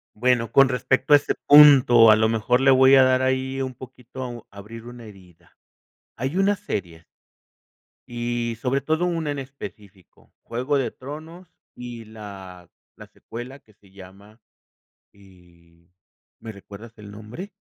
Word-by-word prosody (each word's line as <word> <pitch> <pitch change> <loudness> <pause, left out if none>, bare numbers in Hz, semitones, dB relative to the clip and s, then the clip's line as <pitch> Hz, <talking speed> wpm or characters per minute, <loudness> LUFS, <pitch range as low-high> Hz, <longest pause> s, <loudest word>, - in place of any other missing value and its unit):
Bueno, 120 0 0
con 135 -1 +5
respecto 130 +3 0
a - - +9
ese 145 - -3
punto, 135 -6 +7
a - - +6
lo 110 +1 +1
mejor 115 +3 0
le 135 - +3
voy 130 0 +5
a 135 -1 +7
dar 130 0 +2
ahí 130 +1 -2
un 130 -1 -6
poquito 125 -1 -10
abrir 105 +3 -12
una 120 -1 -11
herida. 90 -5 -18 0.6
Hay 130 +7 -4
una 195 +2 +1
serie 85 - -6 1.0
y 120 -1 -4
sobre 135 +1 -1
todo, 160 +5 -1
una 165 -4 -2
en 145 - -5
específico 105 -8 -13
Juego 130 +5 -2
de 135 - -2
Tronos 160 +6 -11 0.3
y 120 -2 -9
la 95 -5 -12 0.3
la - - -14
secuela 120 +4 -10
que 110 -6 -26
se 100 -1 -25
llama 100 +3 -16 0.7
y, 85 -3 -23 0.5
¿me 110 0 -9
recuerdas 105 +2 -13
el 105 -1 -12
nombre? 110 - -10
120 Hz, 145 wpm, -22 LUFS, 105-135 Hz, 1.0 s, a